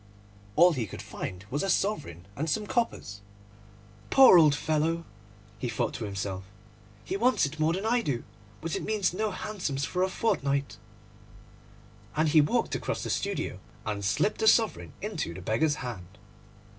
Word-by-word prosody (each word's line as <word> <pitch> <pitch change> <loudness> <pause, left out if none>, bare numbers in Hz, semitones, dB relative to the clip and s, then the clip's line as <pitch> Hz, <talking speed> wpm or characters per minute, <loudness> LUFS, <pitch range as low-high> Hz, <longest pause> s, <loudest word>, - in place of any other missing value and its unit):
All 175 +2 +6
he 120 -7 -2
could - - -9
find 90 +2 -6
was 145 - 0
a 195 - -1
sovereign 150 - -1
and 160 +6 -2
some 210 +6 0
coppers. 200 - -2 0.9
'Poor 265 -10 +8
old 150 -3 +5
fellow,' 160 +3 0 0.5
he 120 - -2
thought 115 - -1
to 115 - -4
himself, 95 -1 -4 0.6
'he - - -3
wants 250 -1 +3
it 145 +3 -6
more 155 +1 +2
than 190 +4 -3
I 240 +2 +2
do, 130 - -2 0.4
but 165 -1 -3
it - - -3
means 210 -5 0
no 215 +3 0
hansoms 180 -9 -3
for 180 - -2
a 190 - +2
fortnight'; 140 -10 0 1.4
and 155 +1 +2
he 155 0 +6
walked 145 - 0
across - - -2
the - - -2
studio - - -2 0.3
and 105 -2 -3
slipped 110 - +1
the 220 - +2
sovereign 205 - +3
into 85 - -3
the 95 - -7
beggar's 145 - +1
hand. 100 -5 -7
155 Hz, 165 wpm, -28 LUFS, -, 1.4 s, Poor